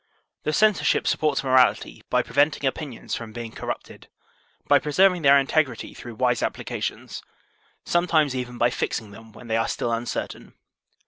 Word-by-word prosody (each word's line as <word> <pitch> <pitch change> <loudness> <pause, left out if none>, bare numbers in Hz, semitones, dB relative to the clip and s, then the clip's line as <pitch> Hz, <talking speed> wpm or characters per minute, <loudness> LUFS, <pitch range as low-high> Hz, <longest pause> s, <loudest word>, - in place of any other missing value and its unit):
The 155 - +1
censorship 215 +5 +2
supports 150 -3 +1
morality 130 -1 +2
by - - +2
preventing 145 0 +1
opinions 135 -1 -4
from 115 -2 -5
being 115 -2 -6
corrupted, - - -7 0.6
by 145 - +5
preserving 180 +6 +3
their 140 -1 +6
integrity 135 -2 0
through 120 -2 -10
wise 125 0 +1
applications, - - -4 0.6
sometimes 160 -5 +2
even 125 -1 -5
by 120 +1 +2
fixing 110 -3 -3
them 110 +2 -14
when 120 - -13
they 110 0 0
are 115 - 0
still 120 - -2
uncertain. 115 +1 -5
130 Hz, 145 wpm, -24 LUFS, 120-150 Hz, 0.6 s, their